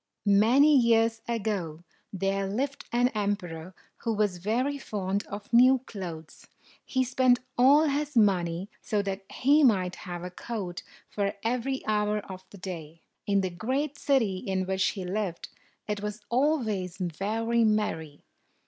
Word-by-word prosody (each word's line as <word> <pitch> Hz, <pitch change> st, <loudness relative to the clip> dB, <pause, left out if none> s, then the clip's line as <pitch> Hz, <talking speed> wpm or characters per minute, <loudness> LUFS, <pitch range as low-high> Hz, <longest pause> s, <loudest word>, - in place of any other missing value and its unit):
Many 235 Hz, +9 st, +5 dB
years 230 Hz, -2 st, +3 dB
ago, 195 Hz, -8 st, -2 dB, 0.3 s
there 195 Hz, 0 st, -1 dB
lived 265 Hz, +8 st, -3 dB
an 245 Hz, +1 st, +3 dB
emperor 190 Hz, -6 st, -3 dB, 0.2 s
who 230 Hz, -, -2 dB
was 205 Hz, -4 st, 0 dB
very 250 Hz, +9 st, -1 dB
fond 200 Hz, -4 st, -3 dB
of 205 Hz, +3 st, -8 dB
new 255 Hz, +3 st, +7 dB
clothes. 170 Hz, -8 st, -8 dB, 0.4 s
He 260 Hz, -1 st, 0 dB
spent 255 Hz, 0 st, +3 dB, 0.2 s
all 275 Hz, +5 st, +6 dB
his 295 Hz, -2 st, -1 dB
money 180 Hz, -4 st, +2 dB
so 210 Hz, -2 st, -1 dB
that 195 Hz, 0 st, -3 dB
he 290 Hz, +4 st, +4 dB
might 185 Hz, -8 st, +3 dB
have 175 Hz, -1 st, -7 dB
a 180 Hz, -, -6 dB
coat 185 Hz, -3 st, -5 dB, 0.3 s
for 200 Hz, -1 st, -2 dB
every 250 Hz, +3 st, -1 dB
hour 210 Hz, 0 st, +1 dB
of 190 Hz, -3 st, -8 dB
the 200 Hz, -, -13 dB
day. 165 Hz, -4 st, -8 dB, 0.2 s
In 200 Hz, -1 st, +3 dB
the 185 Hz, -1 st, -2 dB
great 260 Hz, -, -2 dB
city 230 Hz, -9 st, +2 dB
in 190 Hz, 0 st, -2 dB
which 190 Hz, 0 st, 0 dB
he 190 Hz, -3 st, -3 dB
lived, 185 Hz, -2 st, -3 dB, 0.4 s
it 210 Hz, -1 st, -2 dB
was 210 Hz, +1 st, -5 dB
always 235 Hz, -, 0 dB
very 215 Hz, +7 st, 0 dB
merry. 185 Hz, -9 st, -1 dB
210 Hz, 145 wpm, -28 LUFS, 185-240 Hz, 0.4 s, new